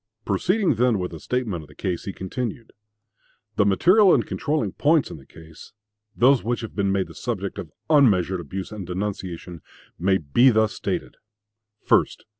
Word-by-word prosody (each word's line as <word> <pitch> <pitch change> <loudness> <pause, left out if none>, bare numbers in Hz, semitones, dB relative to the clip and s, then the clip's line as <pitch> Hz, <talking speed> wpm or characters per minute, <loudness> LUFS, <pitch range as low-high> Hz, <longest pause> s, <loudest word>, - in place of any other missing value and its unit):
Proceeding 180 - +1
then 120 -1 +2
with 90 -2 -4
a 80 - -8
statement 115 -8 -2
of 75 - -14
the 75 - -18
case, 90 -4 -3
he 100 - -3
continued: 115 +5 -5 0.8
"The 100 - +3
material 185 - +5
and - - 0
controlling 155 0 -2
points 150 0 +2
in - - -8
the 65 - -17
case, 80 0 -15 0.4
those 130 +1 +4
which 120 +1 -2
have 115 - -8
been 100 -2 0
made 95 -1 0
the - - -13
subject 100 -5 -4
of 80 - -7 0.2
unmeasured 100 - +3
abuse 95 +5 -6
and 100 -5 -7
denunciation, 90 -3 -5 0.4
may 95 +2 +2
be 95 - +4
thus 110 -2 +2
stated: - - -4 0.7
1st. - - +2
100 Hz, 170 wpm, -23 LUFS, 90-125 Hz, 0.8 s, material